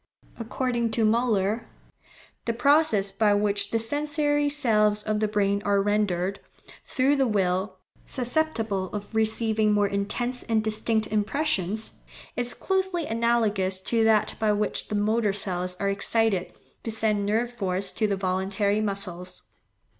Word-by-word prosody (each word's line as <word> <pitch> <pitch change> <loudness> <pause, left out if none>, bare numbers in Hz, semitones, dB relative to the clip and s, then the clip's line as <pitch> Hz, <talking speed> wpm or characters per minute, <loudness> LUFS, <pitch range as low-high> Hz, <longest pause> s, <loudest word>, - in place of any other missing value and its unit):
According 235 0 -1
to 225 -1 +2
Müller, 220 -1 +1 0.8
the 230 - 0
process 245 -6 +3
by 205 +1 +2
which 205 -1 0
the 230 - 0
sensory 290 +4 0
cells 215 -7 +2
of 215 -1 -1
the 215 - +1
brain 200 -1 0
are 200 -1 +2
rendered, 195 -2 0 0.4
through 270 +2 +1
the 270 -1 +2
will, 190 -2 0 0.3
susceptible 240 -7 -1
of 205 +1 -6
receiving 220 -1 +1
more 205 -1 +3
intense 210 +6 -3
and 220 -2 0
distinct 220 0 0
impressions, 215 - -2 0.4
is 245 0 -2
closely 380 -3 -1
analogous 220 -5 +1
to 225 +4 +1
that 220 -1 +3
by 215 -1 +2
which 210 0 -1
the 210 - -3
motor 210 0 +1
cells 180 -2 -2
are 200 - 0
excited 200 -1 +1 0.3
to - - -5
send 215 -2 0
nerve 225 +4 0
force 190 -4 0
to 215 - 0
the 200 -1 -1
voluntary 195 +2 0
muscles. 185 -3 -4
215 Hz, 140 wpm, -25 LUFS, 200-235 Hz, 0.8 s, process